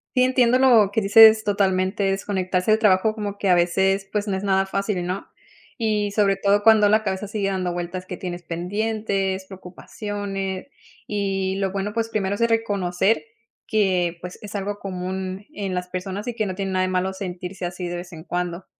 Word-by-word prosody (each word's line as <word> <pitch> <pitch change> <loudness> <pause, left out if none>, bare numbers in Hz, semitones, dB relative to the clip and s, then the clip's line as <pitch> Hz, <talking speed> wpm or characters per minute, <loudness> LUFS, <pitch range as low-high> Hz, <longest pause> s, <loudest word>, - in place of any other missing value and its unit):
Sí, 255 - +5
entiendo 255 -1 +3
lo 230 -7 +5
que 215 - +1
dices, 220 +1 +7
totalmente 195 0 +1
desconectarse 195 0 0
del 220 - +4
trabajo, 210 +1 +4
como 205 -2 -4
que 200 - -2
a 180 - +5
veces 190 +3 +1
pues 210 0 -1
no 195 - 0
es 190 - -4
nada 195 -1 +2
fácil, 195 -2 -2
¿no? 185 +2 -4 0.5
Y 210 -3 0
sobre 200 -1 +2
todo 200 +1 +2
cuando 220 -2 +6
la 215 +1 +4
cabeza 195 +1 -3
sigue 210 -2 -1
dando 185 -2 -1
vueltas, 175 +1 -5
que 180 -1 -7
tienes 175 -1 -6
pendientes, 195 +2 -2
preocupaciones. 195 +1 -6 0.4
Y 195 -2 -1
lo 195 -1 0
bueno, 200 +1 -3
pues 230 0 -1
primero 200 -2 -1
es 205 - -6
reconocer 205 -3 +1 0.4
que 180 -5 +1
pues 180 +1 -8
es 210 -1 -9
algo 205 +1 -3
común 190 +1 -5
en 195 -6 -4
las 180 0 -3
personas 190 +4 -5
y 240 - -3
que 215 -2 -1
no 185 - -4
tiene 195 -1 -3
nada 185 - +2
de 185 - 0
malo 185 +1 0
sentirse 180 -1 -6
así 175 0 -4
de 175 - -4
vez 175 +1 -7
en 160 -1 -10
cuando. 180 0 -3
195 Hz, 190 wpm, -23 LUFS, 185-210 Hz, 0.5 s, dices